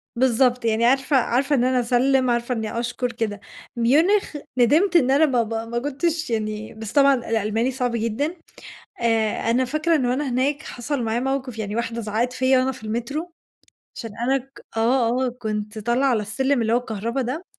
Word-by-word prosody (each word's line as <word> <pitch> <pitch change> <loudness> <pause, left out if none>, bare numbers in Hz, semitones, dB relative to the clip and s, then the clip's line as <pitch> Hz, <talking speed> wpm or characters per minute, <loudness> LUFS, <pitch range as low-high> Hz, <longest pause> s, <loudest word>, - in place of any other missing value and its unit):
بالضبط، 250 0 +2
يعني 225 +1 +2
عارفة 270 +3 +2
عارفة 265 +4 +1
إن 245 - +2
أنا 255 0 +2
أسلِّم، 255 +2 +2
عارفة 240 +1 0
إنّي 220 0 -3
أشكر، 245 +1 -2
كده. 225 -4 -3 0.4
ميونخ، 305 - +2 0.2
ندِمت 305 - +3
إن 265 -6 +5
أنا 285 +4 +5
ما 250 -5 +2
ب 225 0 -6
ما 230 +1 -3
كنتش 310 +4 -2
يعني 215 -1 -3
بس 220 -1 -7
طبعًا 280 -1 +5
الألماني 225 0 -1
صعب 250 -1 -1
جدًا. 230 +9 -1 0.7
آآ، 225 -1 +1
أنا 250 +3 +2
فاكرة 310 +6 0
إن 260 -5 0
وأنا 260 +3 0
هناك 275 +4 0
حَصَل 255 +1 -4
معايا 225 +1 -1
مَوقِف، 265 -2 -3
يعني 210 0 -3
واحدة 235 0 -2
زعقت 225 +3 -1
فيّا 260 +1 +3
وأنا 260 +1 +1
في 220 - -12
المترو 275 +10 -4 0.6
عشان 225 - -6
أنا 260 +4 +1
ك 270 +1 -16 0.2
آه، 240 +2 +2
آه - - 0
كنت 215 -2 -4
طالعة 240 +5 +1
على 230 -5 +1
السلِّم 265 +5 0
اللي 225 0 0
هو - - +4
الكهربا 230 +2 -3
ده، 265 +9 -4
245 Hz, 185 wpm, -23 LUFS, 230-270 Hz, 0.7 s, إن